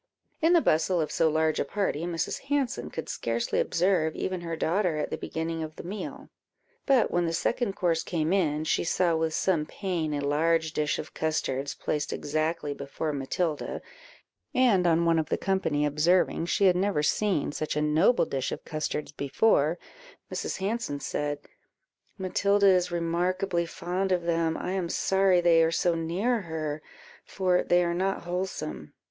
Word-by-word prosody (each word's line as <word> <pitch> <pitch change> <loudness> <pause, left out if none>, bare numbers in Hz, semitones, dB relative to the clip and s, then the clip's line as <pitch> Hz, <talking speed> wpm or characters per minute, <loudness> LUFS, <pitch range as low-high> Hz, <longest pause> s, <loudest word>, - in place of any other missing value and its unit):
In 325 +2 +4
the 340 - +6
bustle 165 - +2
of 155 - -1
so 160 - +2
large 155 0 +1
a - - +2
party, 170 0 -2
Mrs. 165 -2 -2
Hanson 280 -3 -1
could 160 - -6
scarcely 115 0 -1
observe 170 -3 +1
even 185 -1 -3
her 165 -1 -4
daughter 170 0 0
at 150 - -2
the - - 0
beginning 165 0 -4
of 155 0 -6
the - - -8
meal; 195 +5 -6 0.6
but 270 -4 +4
when 175 -1 +1
the 165 - -2
second 220 +3 0
course 165 -2 +1
came 165 0 -1
in, 155 -6 +1
she - - +1
saw 175 0 +1
with 160 0 0
some 165 -5 +1
pain 170 -6 -2
a 145 - -2
large 160 +2 +1
dish 150 -2 0
of - - -7
custards 140 -3 -2
placed 150 -1 -2
exactly 155 0 -2
before 140 +2 -4
Matilda; 150 +3 -2 0.8
and 220 -9 +4
on 170 0 +3
one 165 -1 +3
of 155 - -2
the - - +1
company 185 -6 0
observing 165 +3 +2
she 200 - +2
had 185 -2 +5
never 185 -4 +1
seen 185 -3 +1
such 155 +1 -3
a 150 - +1
noble 160 +9 +3
dish 135 -4 -2
of - - -6
custards 155 -1 -3
before, 150 +2 +2 0.6
Mrs. - - -3
Hanson 200 -6 -2
said 145 0 -2 0.8
"Matilda 200 +1 +2
is 180 -2 +4
remarkably 175 +1 0
fond 185 +3 -2
of 180 -2 +1
them; 165 -1 0
I 180 - -3
am 185 -3 -2
sorry 190 -1 +3
they 170 -1 +5
are 165 - +4
so 175 +1 +1
near 185 +9 0
her, 155 -3 -4 0.4
for 185 -2 +1
they 175 0 +3
are 170 0 0
not 190 +2 -1
wholesome." 175 - -4
170 Hz, 170 wpm, -27 LUFS, 155-185 Hz, 0.8 s, the